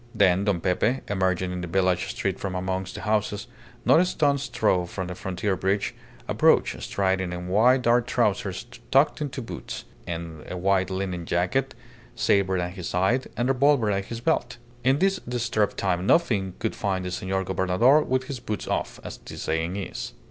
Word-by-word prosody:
Then 95 0 +4
Don 100 -4 +1
Pepe, 105 +9 +1
emerging 95 -2 0
in 90 0 -4
the 90 - -4
village 90 0 +1
street 95 -1 -2
from 95 -2 -3
amongst 95 +1 -3
the - - -6
houses, 105 -1 0 0.4
not - - +6
a 180 - +4
stone's 140 -5 +1
throw 90 -5 +1
from 95 +1 -4
the 90 - -5
frontier 95 +2 -2
bridge, 95 +2 0 0.3
approached, - - +3
striding 95 -2 0
in 90 0 -5
wide 125 +7 +4
dark 120 0 +3
trousers 100 -4 0 0.2
tucked 145 +3 +3
into 135 -3 -3
boots, - - -7 0.2
a 85 0 -6
white 95 0 +2
linen 95 -3 -3
jacket, 120 +10 0 0.4
sabre 95 -1 +2
at 90 0 -2
his 90 -4 -5
side, 95 +9 +1
and 120 - +1
revolver 135 -4 +3
at 100 0 -1
his 115 +2 -6
belt. 125 -4 0 0.3
In 130 +3 +4
this 195 +4 +2
disturbed 115 -4 -1
time 95 -1 0
nothing 100 - +2
could - - -2
find 95 -2 -1
the 90 - -3
Senor 95 +1 -1
Gobernador 95 - +3
with 130 -2 0
his 135 -1 -6
boots 110 -3 -4
off, - - -2
as - - -7
the - - -10
saying 80 +3 -1
is. 100 -1 -5
95 Hz, 175 wpm, -25 LUFS, 90-120 Hz, 0.4 s, not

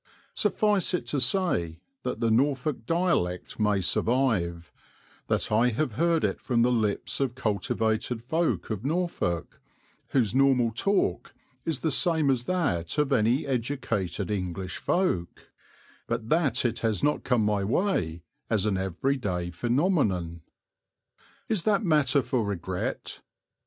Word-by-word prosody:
Suffice 210 -3 +1
it - - -3
to 140 - 0
say 125 - +1 0.2
that - - -3
the 115 -1 +2
Norfolk 130 0 0
dialect 165 - 0
may 105 -2 +2
survive, 90 -4 0 0.5
that - - 0
I 115 +3 +4
have 125 +4 -1
heard 165 +8 +1
it - - -1
from 120 -3 +1
the 125 - +3
lips 110 -4 0
of 130 -3 -1
cultivated 110 0 -1
folk 160 0 -1
of 105 -1 -3
Norfolk, 155 - -2 0.5
whose 115 -7 +1
normal 130 -3 +3
talk 195 - 0 0.3
is 160 -5 -2
the 160 - 0
same 160 -3 +3
as 125 -2 -1
that 140 - -1
of 145 -2 +2
any 120 +4 +2
educated 115 - -2
English 95 -2 -3
folk, 135 - -1 0.6
but 115 -1 -3
that 140 -7 +2
it 115 0 0
has 110 -5 -1
not 150 - +1
come 120 -4 +2
my 105 -2 +1
way 95 - 0 0.3
as 110 -3 +1
an 105 -3 +1
every 95 +9 -1
day 90 -7 -3
phenomenon. 105 - 0 1.1
Is 215 -5 0
that 205 +3 +2
matter 145 -6 +3
for 120 0 0
regret? 100 -5 -4
120 Hz, 135 wpm, -27 LUFS, 100-150 Hz, 1.1 s, I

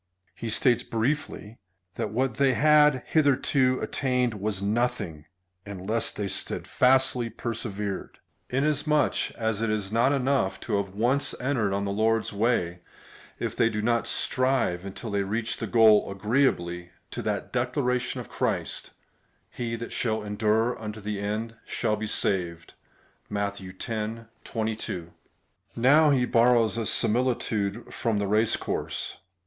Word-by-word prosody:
He 115 - -6
states 120 +2 +3
briefly, 115 -2 -3 0.3
that - - -3
what 125 +2 -1
they 135 -2 +4
had 150 -2 +5
hitherto 135 -3 +2
attained 125 -3 0
was 105 -1 -2
nothing, 100 -7 -1 0.4
unless 100 +3 -1
they 105 - -3
steadfastly 125 +4 +2
persevered, 105 -3 -4 0.3
inasmuch 150 +2 +1
as 110 -2 -1
it 115 - 0
is 105 -2 -2
not 120 +4 +3
enough 135 -7 +1
to 105 -4 -1
have 100 -1 -3
once 125 +6 +1
entered 125 -6 0
on 100 +1 -1
the 100 - -2
Lord's 110 +1 +1
way, 100 -5 0 0.6
if - - -3
they 115 - +3
do 110 - -3
not 115 +2 +1
strive 130 -9 +1
until 100 +3 -6
they 100 0 +1
reach 110 +4 -2
the 115 - -4
goal, 110 -2 +5
agreeably 95 -5 0 0.2
to - - -4
that - - -3
declaration 125 0 0
of - - -7
Christ - - -3 0.3
— - - -42
He 115 -1 -3
that 115 0 -7
shall 110 -2 -1
endure 110 +3 +1
imto 110 -1 -7
the 105 -1 -3
end, 105 +3 -3
&c. 105 -5 -1 0.7
(Matt. 100 -1 -2
x. 105 +4 -4 0.3
22.) 110 -6 -4 0.6
Now 145 +6 +5
he 130 -3 +3
borrows 115 -1 +4
a 110 - -1
similitude 115 -3 0
from 115 -3 0
the 100 - 0
race 105 +2 +2
course. - - -4
115 Hz, 135 wpm, -26 LUFS, 105-125 Hz, 0.7 s, had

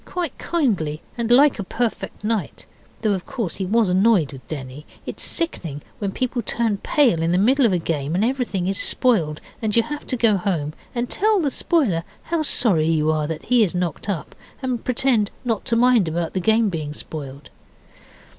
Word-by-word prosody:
quite 350 -6 -4
kindly 195 - 0 0.2
and 235 -1 -2
like 270 +1 +5
a - - -1
perfect 225 +2 -3
knight, 215 -2 -2 0.4
though, 215 -2 +3
of 185 -2 -3
course, 215 -10 -3
he 190 - -2
was 225 +2 +3
annoyed 185 -5 +3
with 130 - -12
Denny. 140 -1 -7 0.2
It - - -6
is - - -3
sickening 165 - -2 0.2
when 200 -3 -2
people 250 +2 -2
turn 225 -1 0
pale 235 - +2
in 165 +1 +1
the 180 - +3
middle 250 +6 +4
of - - 0
a 180 - +2
game 160 -2 -2
and 200 +4 +2
everything 235 -8 -1
is 195 0 -1
spoiled, 170 -12 +1 0.2
and 215 -2 0
you 230 - +5
have 295 +2 -6
to 255 - -1
go 225 -3 +4
home, 165 -6 -2 0.2
and 240 0 -1
tell 425 - +2
the 295 -5 0
spoiler 235 - +1 0.2
how 335 -1 -1
sorry 200 - +2
you 155 -1 +2
are 155 -1 0
that 160 0 -5
he 245 -2 +4
is 180 -4 -1
knocked 180 +2 -2
up, 180 -6 -3 0.3
and 250 -3 -2
pretend 245 -4 +2 0.2
not 225 -4 -1
to 230 - 0
mind 240 -5 +4
about 165 +1 -2
the 190 - 0
game 220 +2 +3
being 155 -4 -4
spoiled. 140 -3 -8
205 Hz, 200 wpm, -22 LUFS, 165-245 Hz, 0.4 s, like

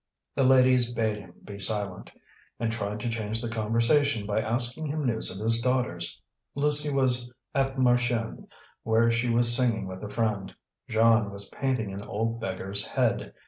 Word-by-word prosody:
The 135 - 0
ladies 130 -2 +4
bade 110 -3 -2
him 90 -3 -15
be 100 -1 -10
silent, 100 -2 -2 0.5
and 115 0 -1
tried 105 -2 -4
to 120 - -2
change 110 -1 -3
the 120 - -4
conversation 115 +3 +1
by 105 +1 -1
asking 120 +7 0
him 150 0 -3
news 115 -3 +1
of 95 - -6
his 115 +2 +3
daughters. 115 -9 -2 0.4
Lucie 150 +1 +5
was 125 -3 0 0.2
at 135 -1 0
Marchiennes, 120 -2 0 0.3
where 115 +1 +2
she 120 +1 -1
was 120 0 +6
singing 120 -4 0
with 95 +1 -8
a 105 - -6
friend; 105 -3 -3 0.3
Jeanne 110 -1 +3
was 100 0 -3
painting 125 -7 -3
an 100 - -7
old 115 +2 -3
beggar's 95 -1 -3
head. - - -1
115 Hz, 165 wpm, -26 LUFS, 105-125 Hz, 0.5 s, was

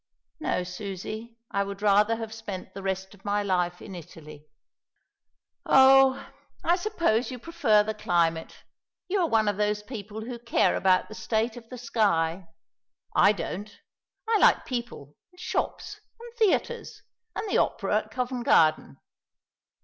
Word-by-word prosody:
"No, 180 -11 -1
Susie. 205 +5 -7
I 200 - +1
would 200 +1 -7
rather 210 +2 +4
have 225 -1 -6
spent 210 -5 -7
the 195 - -7
rest 190 0 -3
of 195 -1 -19
my 205 0 0
life 180 -2 -1
in 200 - -9
Italy." 155 -3 -12 1.2
"Oh, 270 0 +6 0.4
I 345 - +3
suppose 340 - 0
you 255 - -6
prefer 235 -6 +2
the 220 +1 -3
climate. 170 -5 -1 0.4
You 395 +2 0
are 345 - +2
one 220 -1 +2
of 205 -1 0
those 210 0 0
people 215 -2 -7
who 235 +1 -6
care 235 0 +2
about 185 -1 +2
the - - -10
state 220 +1 -1
of 230 -2 -12
the 255 - -8
sky. 190 -7 0 0.7
I - - +6
don't. 205 +1 -6 0.5
I 445 -2 +3
like - - +4
people, 235 - -5 0.2
and 360 - -20
shops, 365 - -3 0.2
and 470 0 -11
theatres, 470 +2 0 0.3
and - - -3
the - - +2
opera 205 0 +1
at 215 - -11
Covent 250 +1 -3
Garden. 155 - +3
215 Hz, 150 wpm, -27 LUFS, 190-245 Hz, 1.2 s, Oh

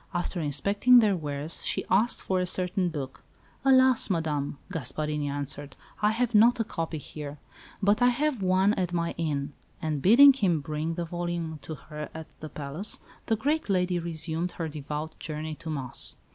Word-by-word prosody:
After 175 0 -2
inspecting 200 - +4
their 215 -4 +5
wares 150 -1 -2
she - - 0
asked 215 +6 +2
for 190 -1 0
a 180 - 0
certain 180 0 0
book. 135 -5 -6 0.4
"Alas! 260 -3 +5
Madame," 150 -5 -1
Gasparini 150 -1 -2
answered, 145 0 -5 0.3
"I 210 - +4
have 235 +2 0
not 235 +3 +6
a - - +3
copy 165 -6 -4
here, 150 0 -7 0.5
but 205 +4 +3
I 245 - +6
have 265 -1 0
one 190 +2 +3
at 180 -3 -2
my 170 -1 0
inn." 145 -3 -2 0.3
And 155 -4 -2
bidding 265 - +8
him 190 - +1
bring 155 +2 -3
the 170 0 -3
volume 170 -2 -4
to 160 - -6
her 150 +1 -8
at 160 0 -6
the 155 - -7
palace, 150 +9 -5 0.3
the 225 - +3
great 290 +5 -1
lady 180 -2 +1
resumed 165 +1 -2
her 165 - -3
devout 150 +1 -6
journey 155 0 -4
to 160 +1 -8
Mass. 135 -5 +1
170 Hz, 175 wpm, -27 LUFS, 150-200 Hz, 0.5 s, bidding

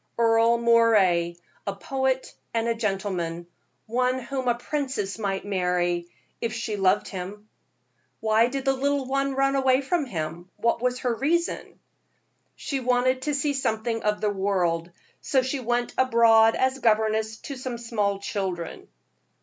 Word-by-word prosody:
"Earle 230 0 +4
Moray, 215 -8 +4 0.3
a 200 - -2
poet 265 +4 -1 0.2
and 230 0 +1
a 230 - +2
gentleman 190 -6 -2 0.4
one 250 +3 +1
whom 260 +1 -4
a 240 - +3
princess 260 -6 -3
might 195 -2 -2
marry, 180 -3 0 0.3
if 230 -1 -2
she 225 -2 -3
loved 195 0 +2
him." 200 +3 -7 0.7
"Why 220 +1 +3
did 270 +2 -4
the 270 - +3
little 280 +1 0
one 275 +1 -1
run 275 0 +2
away 265 0 +3
from 305 +2 0
him? 170 -2 -5
What 235 0 0
was 250 0 0
her 245 -2 +1
reason?" 330 +8 -1 0.8
"She 275 - -3
wanted 255 +1 +1
to 295 +2 -1
see 285 +1 0
something 225 -3 -1
of 210 0 0
the 210 -1 +1
world, 180 -4 0 0.3
so 265 -2 +2
she 260 +2 -2
went 240 0 -1
abroad 230 -3 +5
as 260 +1 +1
governess 220 -1 +1
to 280 - -6
some 255 -1 -5
little 215 -4 -1
children." 190 -4 -4
230 Hz, 150 wpm, -25 LUFS, 200-260 Hz, 0.8 s, abroad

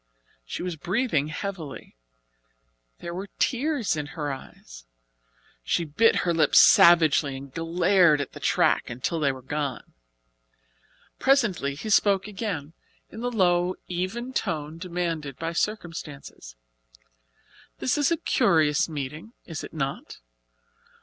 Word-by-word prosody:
She - - -6
was 180 -3 -4
breathing 175 - 0
heavily. 160 - -6 1.1
There 170 - -6
were 190 +3 -6
tears 265 - 0
in 150 -1 -4
her 145 -2 -2
eyes - - -12 0.8
she 170 - 0
bit 210 +10 +3
her 170 - +2
lips 155 -3 +3
savagely 160 -5 +6
and 135 0 -11
glared 170 -1 +3
at 140 - -4
the - - -11
track - - +2
until 130 +7 -3
they 145 -3 +2
were 130 -1 -10
gone. 140 -1 -4 1.3
Presently 215 - +2
he 215 +9 -5
spoke 200 -2 +3
again, 190 -8 -5 0.4
in - - -9
the 245 +1 -2
low, 180 -4 +2
even 195 +9 -4
tone 155 - -3
demanded 170 -6 -3
by 165 +1 -4
circumstances. 165 - -5 1.2
"This 255 - 0
is 290 -2 +2
a 335 - +1
curious 160 - +2
meeting, 150 - -6
is 165 -3 -6
it - - -8
not? 140 -3 -4
165 Hz, 125 wpm, -25 LUFS, 145-200 Hz, 1.3 s, savagely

